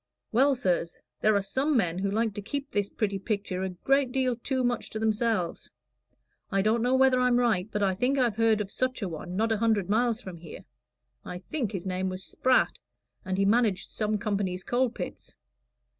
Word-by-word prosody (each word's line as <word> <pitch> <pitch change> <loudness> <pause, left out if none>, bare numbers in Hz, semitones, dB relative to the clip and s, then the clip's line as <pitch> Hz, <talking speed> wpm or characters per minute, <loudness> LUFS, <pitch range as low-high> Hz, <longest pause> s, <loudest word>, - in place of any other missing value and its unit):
"Well, 270 +4 +4
sirs, 180 -8 0 0.2
there 215 0 +3
are 200 - +2
some 265 +8 +1
men 180 -5 0
who 200 +1 0
like 220 +1 0
to 205 - -5
keep 280 +7 -5
this 205 -1 0
pretty 200 -3 -2
picture 200 -2 -2
a 190 - -1
great 265 +8 +1
deal 255 -2 +1
too 260 +2 -2
much 245 -1 -1
to - - -5
themselves. 220 -4 0 0.8
I 195 -1 +2
don't 220 +2 +2
know 250 +2 +2
whether 260 -1 +4
I'm 250 -1 +3
right, 225 -6 +1
but 210 - -1
I 190 -1 +2
think 250 +8 +1
I've 240 -5 +1
heard 225 -2 +3
of 200 -1 -5
such 255 -3 -1
a - - -1
one 175 +2 -6
not 225 +3 +1
a 220 - +2
hundred 210 -4 +1
miles 235 +1 +2
from 185 -7 -8
here. 165 -2 -11 0.6
I 180 - -6
think 235 +5 -3
his 190 -4 -5
name 185 0 -1
was 185 +1 -5
Spratt, 255 0 +2 0.4
and 185 -2 -2
he 195 - +2
managed 210 -3 +2
some 215 -1 -1
company's 200 -4 -2
coal 250 +1 +1
pits." 235 - -8
215 Hz, 205 wpm, -28 LUFS, 190-245 Hz, 0.8 s, Well